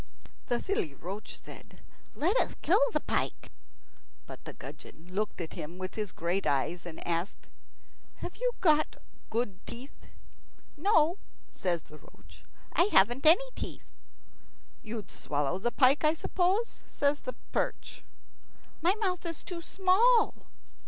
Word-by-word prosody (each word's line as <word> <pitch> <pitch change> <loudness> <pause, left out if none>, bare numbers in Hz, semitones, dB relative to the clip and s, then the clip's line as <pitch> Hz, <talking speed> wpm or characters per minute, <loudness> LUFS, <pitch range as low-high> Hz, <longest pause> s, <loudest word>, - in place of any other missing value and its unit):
The 240 - +2
silly 165 - -1
roach 195 +8 -6
said, - - -13 0.4
"Let 355 +9 +2
us - - +1
kill 390 +8 +5
the - - 0
pike." - - -2 0.7
But - - -10
the - - -6
gudgeon 165 +3 -11
looked 210 +2 -1
at 165 -2 -5
him 165 +4 -7
with 185 0 -5
his 210 -3 -3
great 175 +4 -1
eyes, 165 +6 0
and 160 - -8
asked, 170 +3 -2 0.7
"Have - - -6
you - - 0
got 310 -3 +4 0.3
good 215 -5 -2
teeth?" 250 +4 -9 0.7
"No," 335 0 +3 0.3
says 175 -3 -1
the 155 - -14
roach, - - -18 0.3
"I 345 - +5
haven't 245 - +4
any 375 +11 +7
teeth." - - -5 1.0
"You'd 215 -4 -6
swallow 145 +4 -1
the 240 +5 0
pike, 270 +4 +4
I 305 +1 +4
suppose?" 375 +7 0
says 285 0 +1
the 255 - -5 0.2
perch. - - -2 0.8
"My 355 +5 +4
mouth 375 -5 -1
is 335 -2 -4
too 355 -3 -5
small." 395 +7 +4
255 Hz, 140 wpm, -30 LUFS, -, 1.0 s, any